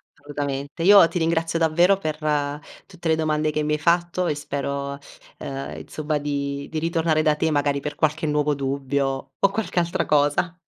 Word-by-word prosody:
Assolutamente. 145 0 -5
Io 195 -1 +8
ti 170 +2 -3
ringrazio 165 0 0
davvero 170 +4 +4
per 155 -5 -3 0.7
tutte 180 -3 -7
le 160 - +4
domande 155 -1 0
che 155 - -1
mi 150 0 0
hai 150 - 0
fatto 175 +2 +1
e 150 - 0
spero, 140 -1 -4 0.4
uhm, 135 -1 -5
insomma 155 0 -3
di 140 -1 -3
di 160 - -3
ritornare 165 -1 +1
da 155 -1 +3
te, 160 +1 0
magari 145 -1 +1
per 145 +1 -5
qualche 155 +2 0
nuovo 150 -1 +1
dubbio, 135 0 -2
o 195 - +4
qualche 200 -3 -1
altra 170 0 -1
cosa! 150 +4 +1
150 Hz, 175 wpm, -23 LUFS, 140-165 Hz, 0.7 s, Io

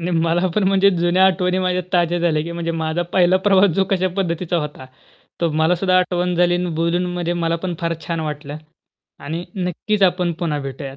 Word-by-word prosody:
नाही 175 +2 -3
मला 170 +2 +1
पण 210 - +1
म्हणजे 195 0 +4
जुन्या 175 +2 +3
आठवणी 185 -1 +1
माझ्या 185 0 0
ताज्या 175 -1 +2
झाल्या 165 -3 +1
की 170 +2 -6
म्हणजे 170 0 -3
माझा 160 +1 -1
पहिला 180 0 +4
प्रवास 195 0 +5
जो 195 - +2
कश्या 185 -1 +1
पद्धतीचा 175 -2 -1
होता? 150 -4 -6 0.5
तो 170 -1 +1
मला 160 +3 +2
सुद्धा 185 +1 +2
आठवण 180 0 0
झाली 175 0 +3
आणि 175 0 -1
बोलून 170 +2 0
म्हणजे 175 -1 -2
मला 165 -1 -1
पण 180 -2 -2
फार 170 0 -1
छान 165 -1 -2
वाटलं. 150 -1 -5 0.6
आणि 160 +5 -5
नक्कीच 190 +3 -2
आपण 180 -2 +2
पुन्हा 165 -4 -1
भेटूयात. 135 0 -7
175 Hz, 195 wpm, -20 LUFS, 165-180 Hz, 0.6 s, प्रवास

